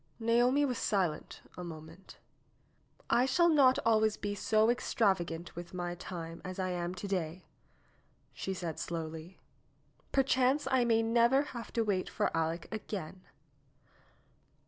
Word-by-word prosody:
Naomi 240 +5 +3
was 250 -4 -2
silent 180 -7 -1
a 180 - -7
moment. 165 +2 -10 0.9
"I 245 +2 +3
shall 340 +6 +4
not 275 -5 +5
always 220 -1 +3
be 205 0 -3
so 215 +2 +3
extravagant 185 -8 0
with 175 +1 -8
my 175 -1 -3
time 170 -2 -7
as 185 -1 -6
I 185 -1 -1
am 175 0 -3
to 185 +3 -6
day," 180 -2 -3 0.9
she 190 - -4
said 170 -4 -5
slowly. 165 +1 -5 0.7
"Perchance 270 +1 +2
I 255 -2 +3
may 225 -1 +3
never 235 +4 +4
have 235 -2 -7
to 230 - +1
wait 195 -4 -1
for - - 0
Aleck 165 +1 -1
again." 190 -4 -6
195 Hz, 135 wpm, -32 LUFS, 175-235 Hz, 0.9 s, not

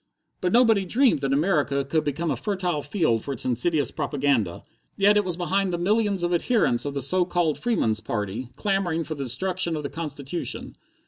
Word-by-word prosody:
But 180 -2 0
nobody 225 -4 +4
dreamed 235 - +3
that 135 -1 -1
America 140 -3 +1
could 155 +3 0
become 150 +3 -2
a - - 0
fertile 185 -7 -2
field 145 - 0
for 140 - -4
its 125 - -3
insidious 130 +3 +1
propaganda. 135 - -1 0.3
Yet 200 +1 +5
it 210 - +3
was 180 -3 -3
behind 190 +2 0
the 175 - -1
millions 200 +1 +1
of 175 0 0
adherents 175 - +2
of 145 0 -4
the 140 - 0
so 180 +8 +3
called 175 -4 0
Freemen's 115 - 0
Party, 110 +2 -4
clamoring 180 -2 0
for 160 - -5
the 140 -3 -5
destruction 175 +7 0
of 150 - -4
the 140 - -5
constitution. 150 0 -4
165 Hz, 190 wpm, -25 LUFS, 140-190 Hz, 0.3 s, Yet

